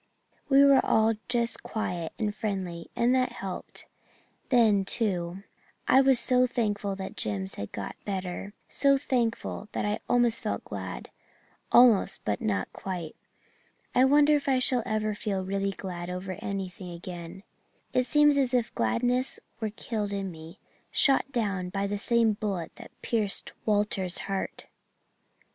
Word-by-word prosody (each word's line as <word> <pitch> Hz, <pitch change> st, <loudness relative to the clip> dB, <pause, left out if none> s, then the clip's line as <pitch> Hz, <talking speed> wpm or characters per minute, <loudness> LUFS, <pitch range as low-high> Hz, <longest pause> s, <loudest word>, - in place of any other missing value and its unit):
We 275 Hz, 0 st, +7 dB
were 275 Hz, -1 st, +6 dB
all 220 Hz, +1 st, +3 dB, 0.2 s
just 235 Hz, -1 st, 0 dB
quiet 175 Hz, -7 st, -3 dB
and 210 Hz, -2 st, -1 dB
friendly, 190 Hz, -6 st, -4 dB
and 240 Hz, +2 st, +3 dB
that 255 Hz, -1 st, +1 dB
helped. 195 Hz, -6 st, -6 dB, 0.6 s
Then, 220 Hz, -6 st, +4 dB
too, 190 Hz, -4 st, -1 dB, 0.4 s
I 265 Hz, -, +6 dB
was 265 Hz, -2 st, +5 dB
so 250 Hz, 0 st, +4 dB
thankful 205 Hz, -5 st, -1 dB
that 190 Hz, 0 st, -6 dB
Jims 95 Hz, -2 st, -3 dB
had 100 Hz, -, -6 dB
got 100 Hz, -, -5 dB
better 195 Hz, 0 st, -4 dB
so 275 Hz, -1 st, +3 dB
thankful 235 Hz, -5 st, -2 dB
that -, -, -1 dB
I 210 Hz, 0 st, -1 dB
almost 240 Hz, -2 st, +3 dB
felt -, -, -3 dB
glad -, -, -6 dB, 0.6 s
almost 240 Hz, -5 st, +5 dB
but 105 Hz, -1 st, -1 dB
not 100 Hz, -3 st, -1 dB
quite. 175 Hz, -5 st, -5 dB, 0.8 s
I 255 Hz, -, +5 dB
wonder 295 Hz, +2 st, +5 dB
if 285 Hz, 0 st, -2 dB
I 265 Hz, -, +4 dB
shall 255 Hz, -1 st, +2 dB
ever 215 Hz, 0 st, 0 dB
feel 195 Hz, -2 st, -2 dB
really 195 Hz, +1 st, -1 dB
glad 180 Hz, -3 st, -6 dB
over 180 Hz, +1 st, -4 dB
anything 190 Hz, -2 st, -5 dB
again. 175 Hz, +1 st, -8 dB, 0.5 s
It 255 Hz, 0 st, +2 dB
seems 295 Hz, +2 st, +5 dB
as 260 Hz, -2 st, +2 dB
if 240 Hz, -2 st, 0 dB
gladness 245 Hz, -, 0 dB, 0.2 s
were 220 Hz, -2 st, -1 dB
killed 210 Hz, -1 st, -4 dB
in 195 Hz, -1 st, -3 dB
me 160 Hz, 0 st, -11 dB, 0.3 s
shot 275 Hz, 0 st, +2 dB
down 200 Hz, -7 st, -1 dB
by 195 Hz, +1 st, -2 dB
the 205 Hz, 0 st, -2 dB
same 230 Hz, 0 st, +3 dB
bullet 200 Hz, -5 st, -3 dB
that -, -, -11 dB
pierced 215 Hz, -4 st, -1 dB
Walter's 205 Hz, -3 st, +1 dB
heart. 195 Hz, -1 st, -4 dB
210 Hz, 150 wpm, -28 LUFS, 185-245 Hz, 0.8 s, We